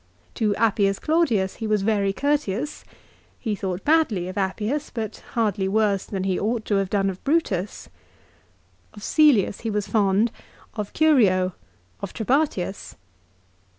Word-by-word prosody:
To 210 -2 0
Appius 200 -3 +2
Claudius 245 - +1
he 225 - -4
was 210 -2 +1
very 200 -2 +1
courteous. 285 +1 -1 0.6
He 220 -4 -2
thought 190 -1 -4
badly 290 - +2
of 185 - -7
Appius, 210 +9 -2
but 220 -3 -5 0.2
hardly 205 -4 0
worse 200 -1 +1
than 195 -2 -4
he 190 -1 0
ought 220 +1 -1
to 205 - +1
have 195 -1 0
done 200 -1 +1
of 185 - -12
Brutus. 210 - -1 1.1
Of 205 - -11
Cselius 275 - +3
he 230 - -3
was 210 -2 -1
fond, 205 +1 +2 0.4
of 210 -2 -5
Curio, 200 - +3 0.5
of - - -6
Trebatius. 225 - -1
210 Hz, 140 wpm, -24 LUFS, 195-240 Hz, 1.1 s, Cselius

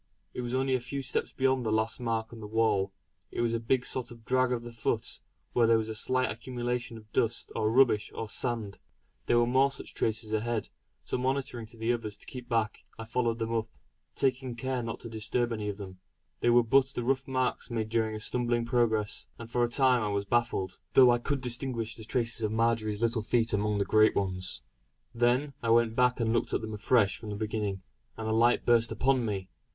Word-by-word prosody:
It - - -4
was 120 +1 -2
only 130 0 +1
a 130 - +2
few 135 +3 -5
steps 130 - -1
beyond 130 -1 +1
the 110 - -1
last 110 +2 0
mark 115 -2 -2
on 115 - -9
the 105 - -7
wall. 105 -3 +1 0.4
It - - -3
was 115 -1 +1
a 115 - -1 0.2
sort 125 -1 -2
of 115 -2 -13
drag 130 0 +2
of 120 -2 -1
the 120 - -8
foot, 115 -2 -2 0.3
where 120 -2 +4
there 115 0 +5
was 110 0 -2
any - - -3
slight 130 +4 0
accumulation 120 +1 -4
of 110 -1 -16
dust, 115 0 0
or 110 - +1
rubbish, 115 -3 +3
or 110 - -4
sand. 110 -2 -2 0.5
There 120 - +4
were 120 - +4
more 130 +3 +4
such 135 - -5
traces 110 -1 -1
ahead. 110 +1 -1 0.4
So - - -2
motioning 130 -3 -2
to 115 +1 -14
the 115 +2 +1
others 105 -4 -4
to - - -14
keep 125 -2 -9
back, 115 -2 0
I 115 - -6
followed 115 0 0
them 115 0 -2
up, 115 -1 0 0.5
taking 130 -2 0
care 130 +1 -2
not 115 -1 -5
to - - -6
disturb 115 +2 -1
any 105 -2 -3
of 100 - -4
them. 95 -2 -9 0.4
They 120 - +2
were 120 0 +6
but 130 +3 +4
the 120 - -2
rough 135 +2 0
marks 130 -1 -1
made 110 -2 -2
during 110 -1 0
a - - -5
stumbling 120 +1 0
progress; 115 -4 +1
and 115 0 -10
for 120 - +2
a - - +3
time 125 0 +3
I 105 - 0
was 100 -1 -1
baffled; 115 -4 0
though 130 -2 +8
I 120 - +2
could 140 +2 -2
distinguish 120 -2 0
the 110 - -9
traces 115 -1 0
of 105 -1 0
Marjory's 110 -1 0
little 115 -1 +2
feet 115 +1 +1
amongst 105 0 +1
the 100 - +1
great 110 0 +4
ones. 95 -2 -2 0.5
Then 125 +4 +2
I 115 - -1
went 115 -1 +4
back 125 0 +3
and 115 -1 +1
looked 120 - 0
at - - 0
them 110 -1 -5
afresh 105 -1 +2
from 110 - -8
the 105 - -4
beginning, 105 -3 -3 0.3
and 110 - -4
a 110 - +1
light 115 +2 +3
burst 115 -1 +4
upon 130 +3 +2
me. 95 -3 -3
115 Hz, 220 wpm, -29 LUFS, 110-125 Hz, 0.5 s, though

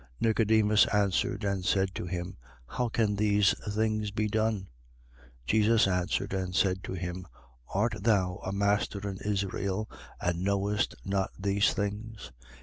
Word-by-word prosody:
3:9. - - -25
Nicodemus 110 -1 +4
answered 105 +3 +1
and 100 -2 -1
said 95 +1 +1
to 90 - -5
him: 90 +1 -4 0.3
How 120 - -2
can 110 -3 0
these 105 -1 +3 0.2
things 110 0 0
be 105 +1 -1
done? 110 -1 0 0.8
3:10. - - -32
Jesus 110 - +4
answered 95 +1 -1
and 95 -1 -2
said 95 -1 +2
to - - -5
him: 90 0 -5 0.4
Art 110 +5 +1
thou 95 -4 +2
a 95 - -3
master 100 0 0
in 95 -1 -5
Israel, 100 0 -2 0.3
and 90 0 -1
knowest 100 +1 0
not 95 0 0
these 100 +1 +2
things? 105 - -4
100 Hz, 145 wpm, -29 LUFS, 95-105 Hz, 0.8 s, Nicodemus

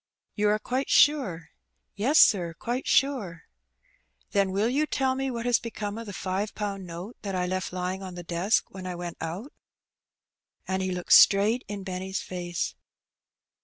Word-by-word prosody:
"You 210 -1 +1
are 210 - +3
quite 255 +5 -2
sure?" 195 - +3 0.4
Yes, 255 +10 +2
sir, 175 - +5
quite 245 +7 -3
sure." 220 - +1 0.9
Then 200 -2 +2
will 200 +4 +1
you 285 +5 +1
tell 265 -3 +1
me 270 0 -2
what 235 -2 -4
has 245 -1 +3
become 220 -2 -5
of 230 - -8
the - - -5
five 195 +2 -3
pound 200 -3 -4
note 175 +7 -8
that 195 -2 -4
I 180 -1 0
left 185 +1 -2
lying 185 +1 -3
on 185 -2 -7
the 175 - -7
desk 175 +6 0
when 185 -1 -7
I 180 - -4
went 175 -1 -6
out?" 180 - -5 1.1
And 190 0 -1
he 190 - -1
looked 180 -1 +1
straight 210 +5 +6
in 205 -1 -6
Benny's 190 0 -4
face. 175 -1 -4
195 Hz, 170 wpm, -27 LUFS, 180-230 Hz, 1.1 s, straight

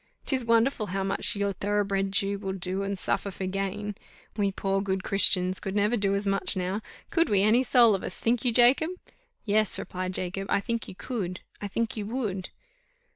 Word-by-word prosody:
'Tis 260 -3 +2
wonderful 230 0 +2
how 195 +1 -2
much 195 +2 0
your 200 0 -1
thoroughbred 200 0 -1
Jew 200 0 0
will 195 -1 -4
do 190 +1 -3
and 200 0 -3
suffer 200 - -1
for 190 0 -5
gain. 195 +2 -3 0.4
We 200 -2 +1
poor 195 0 -1
good 190 -1 -2
Christians 185 -2 +3
could 195 0 -5
never 210 +3 +2
do 200 -3 +1
as 200 +1 +1
much 195 0 +2
now 185 +3 -2 0.3
could 335 0 +2
we 200 -2 +3
any 220 +4 +4
soul 245 -4 +5
of 195 - -1
us, - - -4
think 235 0 +1
you, 245 - +4
Jacob?" 250 +7 +5 0.6
"Yes," 215 0 +2
replied 185 0 -5
Jacob, 195 +2 -3
"I - - +2
think 230 +2 -3
you - - -9
could, 190 -6 -4 0.2
I 205 - -3
think 230 +3 -2
you 210 -2 -4
_would." 210 -6 -3
200 Hz, 195 wpm, -27 LUFS, 195-220 Hz, 0.6 s, soul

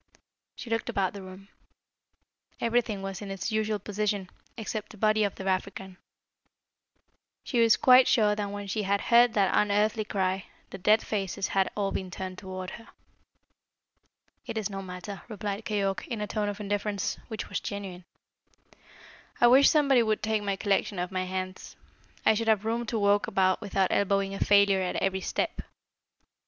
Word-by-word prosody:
She 235 - -9
looked 225 0 -1
about 190 -2 0
the 200 - -8
room. 190 +1 -12 1.1
Everything 230 -4 0
was 195 0 -5
in 205 - -7
its 195 +2 -4
usual 215 0 0
position, 205 -1 -2 0.3
except 215 -1 -4
the 215 - -13
body 215 +1 +3
of 200 - -1
the 190 - -8
African. 190 0 -3 1.5
She 245 - -1
was 225 -2 +5
quite 255 0 +7
sure 215 -4 +4
that 205 -1 -3
when 205 0 -6
she 205 +2 -2
had 200 0 +1
head 235 +1 +4
that 195 -3 +2
unearthly 210 +1 +2
cry, 190 -2 -1 0.3
the 195 - -7
dead 210 +4 +3
faces 195 -2 -2
had 195 -1 +1
all 200 -1 0
been 185 - -4
turned 185 +1 -6
towards 185 -1 -6
her. 230 - -11 1.6
"It - - -4
is 215 -1 -2
no 195 0 -5
matter," 185 +1 -8
replied 210 -1 -5
Keyork 195 -2 -1
in 230 -3 -4
a 210 - -2
tone 210 0 -2
of 205 0 -6
indifference 205 -1 -2
which 220 -3 -5
was - - -3
genuine. 190 -3 -6 1.3
"I - - +5
wish 260 +4 +7
somebody 280 -5 +4
would 215 -2 0
take 215 0 0
my 200 -1 -1
collection 200 0 0
off 180 +1 -3
my 185 0 -2
hands. 185 0 -5 0.5
I 220 - +6
should 225 +1 -2
have 215 -1 +2
room 230 +1 -1
to 225 - -1
walk 205 0 +2
about 185 +1 +2
without 195 -3 0
elbowing 195 0 +1
a 195 - -5
failure 200 -1 +4
at 180 - -2
every 190 0 0
step." - - -2
205 Hz, 170 wpm, -28 LUFS, 195-215 Hz, 1.6 s, quite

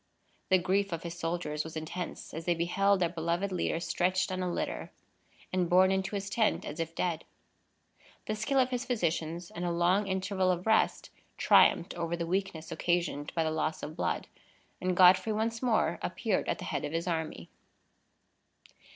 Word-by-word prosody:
The 190 - +6
grief 195 +2 0
of 165 -1 -4
his 170 -1 -5
soldiers 165 -3 -2
was 160 0 -7
intense, 165 +3 -6
as 160 +1 -6
they 175 - +2
beheld 195 +4 +2
their 175 -2 +2
beloved 170 +3 -1
leader 175 -2 -1
stretched 185 +1 0
on 185 0 -2
a 180 -1 -1
litter, - - -3 0.6
and 180 -2 +1
borne 185 +1 +5
into 190 +1 -1
his 200 0 -3
tent 215 +2 +1
as 150 - -6
if 165 0 -3
dead. 170 -3 -1 1.0
The 215 - -1
skill 215 +6 -1
of 255 -1 +3
his 250 0 -1
physicians 170 -6 -2
and 175 - -5
a 175 - 0
long 175 +4 +2
interval 190 0 0
of 180 0 0
rest 220 0 +2 0.3
triumphed 175 - +5
over 170 0 -2
the 170 - -2
weakness 180 -2 -2
occasioned 170 -4 -1
by 165 - +2
the 160 - 0
loss 155 0 -2
of 155 - -6
blood, - - -1 0.6
and 185 -1 0
Godfrey 185 +4 +6
once 225 +1 -1
more 240 -4 +1
appeared - - -1
at - - 0
the - - -7
head - - -2
of 145 - -4
his 165 +2 -2
army. 160 -2 -3
180 Hz, 180 wpm, -30 LUFS, 165-195 Hz, 1.0 s, The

